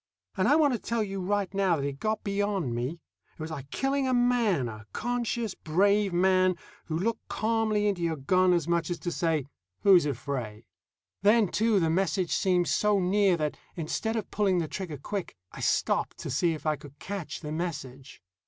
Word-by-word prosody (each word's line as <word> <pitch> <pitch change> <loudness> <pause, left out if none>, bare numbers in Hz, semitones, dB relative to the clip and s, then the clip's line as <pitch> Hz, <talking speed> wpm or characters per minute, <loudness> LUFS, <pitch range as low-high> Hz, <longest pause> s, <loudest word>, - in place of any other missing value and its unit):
And 185 - +1
I 290 - +5
want 300 -4 +4
to 235 - -1
tell 230 +1 -1
you 195 -2 -4
right 200 +1 -1
now 195 -3 +2
that 140 -3 -2
it 140 -1 -4
got 215 0 -1
beyond 200 - -1
me. 120 +5 -2 0.4
It - - -34
was 160 +1 -5
like 140 -3 -7
killing 270 - 0
a 255 - +2
man, 240 - +2
a 110 -2 -9
conscious, 235 -2 -2
brave 200 +5 +2
man 185 +1 +3 0.3
who 160 - -2
looked 225 +6 -2
calmly 220 -1 0
into 195 -4 -1
your 165 -1 0
gun 185 +6 +3
as 170 -3 +1
much 170 -1 0
as 175 - -2
to 175 - -4
say, 165 -5 0 0.4
"Who's 185 -6 +6
afraid?" 125 -7 -4 0.6
Then, 210 0 +4
too, 220 0 +2
the 165 -2 +1
message 180 0 0
seemed 180 -2 +2
so 210 -1 +2
near 190 0 +3
that, 150 -2 -2 0.2
instead 185 +7 -2
of 220 -3 -3
pulling 200 -3 +2
the 165 -2 0
trigger 165 -3 -5
quick, 190 - -5 0.2
I - - -10
stopped - - 0
to - - -5
see 165 +5 +1
if 155 - -11
I 155 -1 +1
could 145 0 -14
catch 185 -4 -6
the 150 -2 -6
message. 140 - -5
185 Hz, 195 wpm, -28 LUFS, 155-210 Hz, 0.6 s, Who's